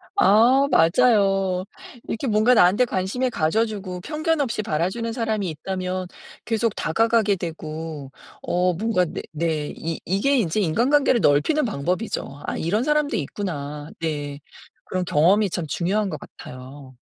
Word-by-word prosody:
아 260 - +5
맞아요. 195 -1 +3 0.4
이렇게 250 +4 -3
뭔가 220 +3 +4
나한테 205 +4 +5
관심을 235 +6 -1
가져 215 +4 +1
주고 190 -4 -6
편견없이 300 - -1
바라 165 +2 0
주는 230 +2 -4
사람이 220 -6 -1
있다면 185 +3 -4 0.4
계속 225 -1 0
다가가게 225 +2 +2
되고 155 -4 -6 0.3
어 180 0 +1
뭔가 190 0 +1
네 - - -6
네, 155 -1 -2
이 165 0 -4
이게 230 +10 +1
이제 210 -2 0
인간관계를 240 - +2
넓히는 150 - +3
방법이죠. 180 -5 -3
'아 - - -3
이런 205 +8 0
사람도 300 0 +1
있구나.' 150 -3 -5
네. 145 -3 -3 0.5
그런 185 -1 -2
경험이 185 +6 +3
참 170 -2 -3
중요한 195 +7 0
것 155 - -5
같아요. 130 +1 -12
190 Hz, 300 characters per minute, -23 LUFS, 160-230 Hz, 0.5 s, 아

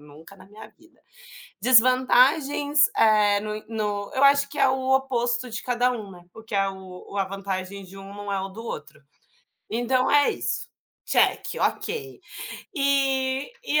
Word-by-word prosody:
nunca 150 +6 -15
na 190 - -16
minha 210 +2 -13
vida. 330 0 -25 0.6
Desvantagens, 260 +4 +4
eh, 210 -2 +4
no 215 0 -5
no 210 -2 -3
eu 265 - +2
acho 280 0 +5
que 295 - -10
é - - +5
o 260 0 +2
oposto 245 -2 -1
de 220 - -5
cada 250 0 +1
um, 215 -5 -7
né, 175 -1 -15
porque 225 -2 -8
é 195 0 +2
o 190 -1 -11
o - - -4
a 195 - +1
vantagem 195 0 -5
de 195 +2 -13
um 195 +1 -10
não 205 0 -5
é 195 - -1
o 195 - -5
do 225 +4 -10
outro. - - -8 0.7
Então, 250 +3 +1
é 290 0 +4
isso, - - -4 0.4
check, - - +2
ok! 420 -4 -2 0.5
E 275 - 0
e, 300 -10 +1
235 Hz, 165 wpm, -24 LUFS, 200-270 Hz, 0.7 s, acho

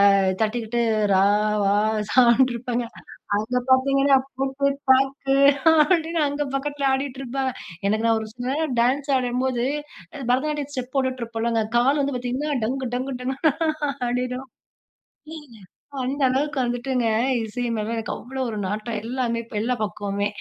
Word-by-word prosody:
அ, - - +4 0.2
தட்டிகிட்டு 225 +1 -1 0.3
"ரா 190 0 +5 0.4
வா 200 0 +3 0.4
சான்டு" 255 +1 +5
இருப்பாங்கே. 240 0 -3 0.5
அங்க 220 +4 -2
பாத்தீங்கன்னா 275 +1 +4 0.2
"போட்டு 270 +1 0 0.2
தாக்கு" 270 +1 +3 0.5
அப்டின்னு 330 -2 +2
அங்க 285 +1 -2
பக்கத்துல 285 0 -1
ஆடிட்டு 270 0 -2
இருப்பாங்க. 265 +1 -2 0.4
எனக்கு 220 +2 +1
நான் 225 -1 +3
ஒரு 220 - -6
சில 245 0 -5
நேரம் 300 -3 -1
டான்ஸ் 275 +4 +1
ஆடம்போது 250 0 -1 0.6
பரதநாட்டியம் 290 +2 0
ஸ்டெப் 255 -1 -5
போட்டுட்டு 260 -2 0
இருப்பேன் 225 -1 -4
இல்லங்க 230 -1 +1 0.2
கால் 275 +5 +3
வந்து 275 -2 -1
பாத்தீங்கன்னா, 250 +5 -3
"டங்கு, 255 +1 -2
டங்கு 255 0 -3
டங்குன்னு" 275 +5 0 0.4
ஆடிடும். 250 +2 -2 0.9
ஏங்க, 295 -7 -12 0.5
அந்த 270 +3 -2
அளவுக்கு 285 +3 -1
வந்துட்டுங்க, 245 0 -1 0.4
இசை 225 +3 -4
மேல 215 +1 -2
எனக்கு 225 -1 -3
அவ்ளோ 265 +2 -6
ஒரு 215 - -5
நாட்டம், 215 +3 -3
எல்லாமே 235 -1 -2 0.2
எல்லா 245 +4 0
பக்கவுமே. 200 -1 -2
255 Hz, 140 wpm, -23 LUFS, 235-275 Hz, 0.9 s, ரா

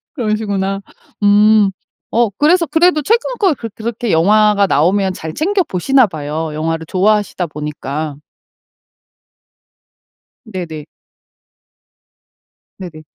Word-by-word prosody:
그러시구나. 205 -5 -2 0.4
음. 205 0 +5 0.4
어 235 -1 +2
그래서 320 - +2
그래도 330 0 +2
최근 460 - +2 0.2
거 385 -7 +3
그렇 230 -4 -7
그렇게 230 0 -3
영화가 205 +4 +3
나오면 190 +5 +1
잘 160 -3 -7
챙겨 385 +5 +1
보시나 260 - +2
봐요 155 -1 -5
영화를 160 +1 -3
좋아하시다 205 -1 +1
보니까. 150 0 -5 2.3
네네. 170 -8 -7 1.9
네네. 170 -5 -9
200 Hz, 230 characters per minute, -16 LUFS, 165-230 Hz, 2.3 s, 음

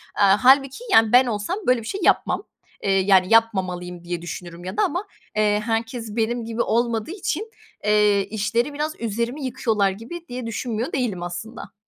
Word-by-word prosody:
Aaa, 200 +4 +4
hâlbuki, 270 - +4
yani, 225 -1 +5
ben 250 +1 +7
olsam 220 - -2
böyle 250 -2 +3
bir 220 - -9
şey 395 - -4
yapmam, - - +2 0.4
eee, 195 - +1
yani, 190 -1 +4
yapmamalıyım 180 -6 +1
diye 175 -1 -4
düşünürüm 175 0 -8
ya 185 +3 -6
da - - +3
ama, 360 +7 -2 0.3
eee, 210 -1 +2
herkes 225 -1 -3
benim 235 +1 -1
gibi 230 +1 -2
olmadığı 235 +3 0
için, 410 +2 -3 0.3
eee, 210 -1 +3
işleri 230 +6 -1
biraz 305 +2 -2
üzerime 235 +5 -3
yıkıyorlar 225 -6 +1
gibi 235 - -8
diye 250 0 -6
düşünmüyor 230 +3 -3
değilim, 215 -10 -1
aslında. 215 +6 -7
225 Hz, 165 wpm, -23 LUFS, 200-250 Hz, 0.4 s, ben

